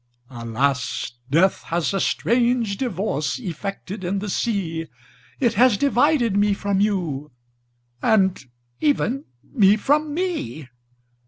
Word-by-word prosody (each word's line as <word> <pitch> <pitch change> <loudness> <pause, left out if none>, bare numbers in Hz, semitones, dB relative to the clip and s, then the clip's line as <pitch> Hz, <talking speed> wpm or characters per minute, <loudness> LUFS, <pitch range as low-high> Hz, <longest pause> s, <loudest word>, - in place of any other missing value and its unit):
''Alas! 125 +2 -1 0.2
death 170 +7 +3
has 170 +2 -1
a 195 - 0
strange 235 -2 +1
divorce 185 - -2
Effected 195 0 -6
in 185 +3 -1
the 200 0 -3
sea. 170 -9 -2 0.5
It 240 -4 +2
has 240 -1 +4
divided 275 -4 +2
me 205 0 +3
from 200 -1 -1
you, 170 -9 -1 0.7
And 190 -7 +2 0.4
even 275 -2 +1 0.2
me 205 -5 +4
from 295 +6 +1
me! 315 - -3
200 Hz, 110 wpm, -22 LUFS, 170-240 Hz, 0.7 s, has